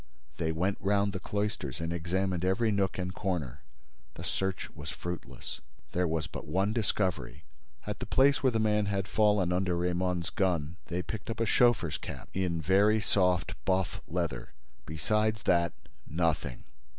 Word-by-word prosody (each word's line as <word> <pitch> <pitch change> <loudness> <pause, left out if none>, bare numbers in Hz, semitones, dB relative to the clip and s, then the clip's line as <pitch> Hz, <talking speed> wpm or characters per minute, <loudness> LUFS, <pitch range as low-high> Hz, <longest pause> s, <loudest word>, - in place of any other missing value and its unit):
They 80 -1 0
went 90 +5 0
round 100 0 +2
the 95 - -3
cloisters 100 - -2
and 85 0 -2
examined 90 +1 -1
every 110 +5 +2
nook 100 -2 +1
and 90 0 -2
corner. 80 -10 -2 0.5
The - - -7
search 95 -1 -2
was 75 -2 -8
fruitless. 85 -5 -6 0.3
There 90 +2 +1
was 80 -1 0
but - - -7
one 95 +7 +1
discovery: 105 -5 -1 0.4
at - - -4
the - - -5
place 135 +1 +4
where 130 - +4
the 115 - 0
man 105 -1 +2
had 100 -1 -1
fallen 105 -4 +3
under 90 -1 +1
Raymonde's 90 0 0
gun, 85 -5 0
they 90 +1 -2
picked 110 +2 -6
up 115 - -3
a 115 - +2
chauffeur's 115 -8 +3
cap, - - -8
in 90 -3 0
very 100 +7 +4
soft 90 -3 +2
buff 95 +5 0
leather; - - -3 0.3
besides 105 +7 0
that, 85 -2 +3 0.4
nothing. 80 -5 -1
95 Hz, 160 wpm, -30 LUFS, 85-105 Hz, 0.5 s, place